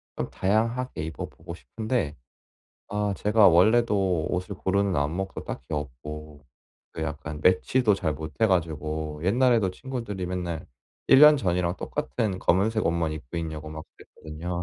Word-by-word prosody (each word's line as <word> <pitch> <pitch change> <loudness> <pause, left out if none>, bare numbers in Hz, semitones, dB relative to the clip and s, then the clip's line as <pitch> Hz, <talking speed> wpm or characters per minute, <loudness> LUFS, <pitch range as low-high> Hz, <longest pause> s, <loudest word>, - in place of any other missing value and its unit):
좀 - - -3
다양하게 115 0 0
입어 80 - -5
보고 85 +1 -10
싶은데 110 - -3 0.7
아 105 0 -1
제가 105 -1 +5
원래도 95 -2 +3
옷을 90 +2 -3
고르는 95 0 0
안목도 85 +7 -2
딱히 65 - -6
없고 75 +2 -7 0.6
약간 80 -1 -4
매치도 105 +5 +3
잘 80 -6 -1
못해 80 +9 -1
가지고 80 -4 -1
옛날에도 115 -2 +3
친구들이 115 -4 -5
맨날 90 -2 -4 0.4
1 150 +2 +9
전이랑 90 -5 0
똑같은 90 - -2
검은색 105 +5 +2
옷만 85 -2 0
입고 75 0 -8
있냐고 80 -2 -4
막 80 0 -8 0.3
그랬거든요. 85 +3 -5
90 Hz, 300 characters per minute, -26 LUFS, 80-105 Hz, 0.7 s, 1